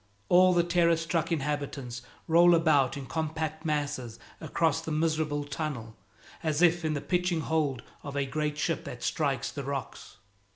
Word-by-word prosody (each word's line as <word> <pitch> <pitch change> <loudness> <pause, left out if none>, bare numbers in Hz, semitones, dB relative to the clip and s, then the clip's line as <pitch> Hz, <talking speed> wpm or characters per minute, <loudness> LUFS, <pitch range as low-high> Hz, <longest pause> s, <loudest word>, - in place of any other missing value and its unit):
All 185 +1 +6
the 175 - +4
terror 170 -1 +3
struck 165 +1 -1
inhabitants 140 -5 -3 0.3
roll 170 +1 +6
about 150 -6 +3
in 140 - -6
compact 160 +1 -3
masses 140 -7 -2 0.2
across 160 0 0
the 160 - -6
miserable 155 -1 0
tunnel, 140 -7 -5 0.5
as 155 0 0
if 175 0 +4
in 155 -1 0
the 145 - -2
pitching 180 -2 0
hold 150 -6 -1 0.2
of 140 -1 -7
a 140 - +1
great 150 +2 -2
ship 165 0 -1
that 120 -1 -7
strikes 140 -5 -1
the 140 - -5
rocks. 135 -2 -6
155 Hz, 160 wpm, -29 LUFS, 140-165 Hz, 0.5 s, All